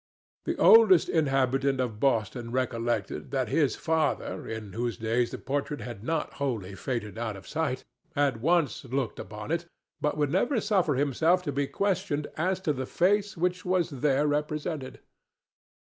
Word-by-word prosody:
The -, -, -1 dB
oldest 220 Hz, -6 st, +7 dB
inhabitant 135 Hz, -3 st, +2 dB
of 115 Hz, -5 st, -2 dB
Boston 120 Hz, -1 st, 0 dB
recollected 120 Hz, -2 st, -2 dB
that 130 Hz, -4 st, -1 dB
his 145 Hz, -1 st, +2 dB
father—in 140 Hz, -, -2 dB
whose 120 Hz, 0 st, -2 dB
days 115 Hz, +2 st, 0 dB
the -, -, -6 dB
portrait 145 Hz, +2 st, -3 dB
had 115 Hz, -4 st, -7 dB
not 160 Hz, +4 st, -2 dB
wholly 110 Hz, -9 st, -2 dB
faded 105 Hz, +1 st, -4 dB
out 110 Hz, -3 st, -3 dB
of 95 Hz, -, -13 dB
sight—had 130 Hz, -3 st, -2 dB
once 165 Hz, +1 st, +2 dB
looked 130 Hz, -4 st, -2 dB
upon 105 Hz, +6 st, -7 dB
it, 170 Hz, +1 st, -1 dB, 0.3 s
but 150 Hz, -, 0 dB
would 145 Hz, -2 st, +1 dB
never 235 Hz, -, +2 dB
suffer 190 Hz, -8 st, +2 dB
himself 160 Hz, +6 st, +2 dB
to 145 Hz, -, -2 dB
be 140 Hz, +1 st, -1 dB
questioned 185 Hz, -6 st, -1 dB
as 185 Hz, +4 st, 0 dB
to 155 Hz, -6 st, +1 dB
the 130 Hz, -1 st, -4 dB
face 205 Hz, +2 st, +1 dB
which 180 Hz, +1 st, 0 dB
was 180 Hz, -2 st, +1 dB
there 140 Hz, +1 st, +1 dB
represented. 150 Hz, -1 st, -2 dB
140 Hz, 150 wpm, -28 LUFS, 120-165 Hz, 0.3 s, oldest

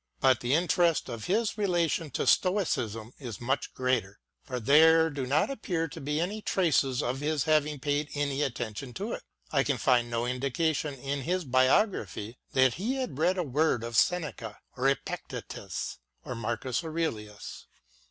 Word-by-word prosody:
But 130 Hz, -2 st, +4 dB
the 125 Hz, +2 st, +1 dB
interest 170 Hz, -1 st, +2 dB
of 115 Hz, -2 st, -5 dB
his 215 Hz, +2 st, 0 dB
relation 170 Hz, -5 st, +1 dB
to -, -, -1 dB
Stoicism 130 Hz, -, +1 dB
is 120 Hz, -7 st, -7 dB
much 130 Hz, +3 st, -1 dB
greater, 125 Hz, -6 st, 0 dB, 0.3 s
for 125 Hz, -3 st, -4 dB
there 160 Hz, +6 st, +6 dB
do 135 Hz, -3 st, -3 dB
not 150 Hz, -, +2 dB
appear 175 Hz, -10 st, -2 dB
to 160 Hz, +2 st, -9 dB
be 150 Hz, +2 st, -1 dB
any 200 Hz, +6 st, -2 dB
traces 145 Hz, -10 st, +1 dB
of 125 Hz, +2 st, -2 dB
his 150 Hz, -1 st, 0 dB
having 150 Hz, -1 st, +2 dB
paid 145 Hz, +1 st, -1 dB
any 145 Hz, -1 st, -1 dB
attention 120 Hz, -2 st, -4 dB
to 210 Hz, +4 st, -3 dB
it: -, -, -4 dB, 0.3 s
I 135 Hz, -3 st, +3 dB
can 140 Hz, -2 st, 0 dB
find 120 Hz, -2 st, +2 dB
no 120 Hz, 0 st, -1 dB
indication 140 Hz, +4 st, -1 dB
in 140 Hz, +1 st, -3 dB
his 180 Hz, +6 st, -1 dB
Biography 130 Hz, -, +1 dB
that 130 Hz, -2 st, +4 dB
he 220 Hz, -, -2 dB
had 255 Hz, -, -4 dB
read 180 Hz, +4 st, +2 dB
a 180 Hz, -, +1 dB
word 145 Hz, -4 st, +1 dB
of 115 Hz, 0 st, -5 dB
Seneca 135 Hz, -8 st, 0 dB, 0.2 s
or 130 Hz, +1 st, +2 dB
Epictetus, 135 Hz, -, -4 dB, 0.3 s
or 125 Hz, -, -4 dB
Marcus 120 Hz, +5 st, -2 dB
Aurelius. 155 Hz, -11 st, -4 dB
140 Hz, 160 wpm, -29 LUFS, 125-165 Hz, 0.3 s, there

